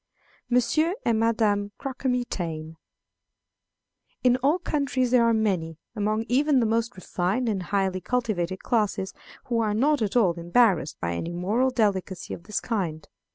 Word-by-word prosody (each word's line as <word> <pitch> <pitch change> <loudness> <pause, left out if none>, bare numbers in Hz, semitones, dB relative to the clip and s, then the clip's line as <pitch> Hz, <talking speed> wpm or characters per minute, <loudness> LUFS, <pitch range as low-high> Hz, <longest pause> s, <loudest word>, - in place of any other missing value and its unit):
Monsieur 310 +8 +2
and 225 -2 +2
Madame 210 -3 +1
Croquemitaine. 235 - -3 1.5
In 250 -1 +5
all 280 +6 +2
countries 270 -7 -1
there 250 -2 +5
are 230 - +4
many, 185 -8 0 0.2
among 215 +1 0
even 280 +2 +3
the 235 - +2
most 230 +2 0
refined 185 +6 -1
and 205 -4 0
highly 190 0 -1
cultivated 190 -6 -2
classes, 205 -4 0 0.3
who 235 -2 0
are 215 -2 +1
not 285 +4 +2
at 210 0 -1
all 205 -8 +4
embarrassed 175 - +2
by 85 0 -2
any 165 - -4
moral 210 +9 +1
delicacy 200 -6 -1
of 170 - -9
this 210 - -2
kind. 175 -9 -3
215 Hz, 145 wpm, -26 LUFS, 185-245 Hz, 1.5 s, In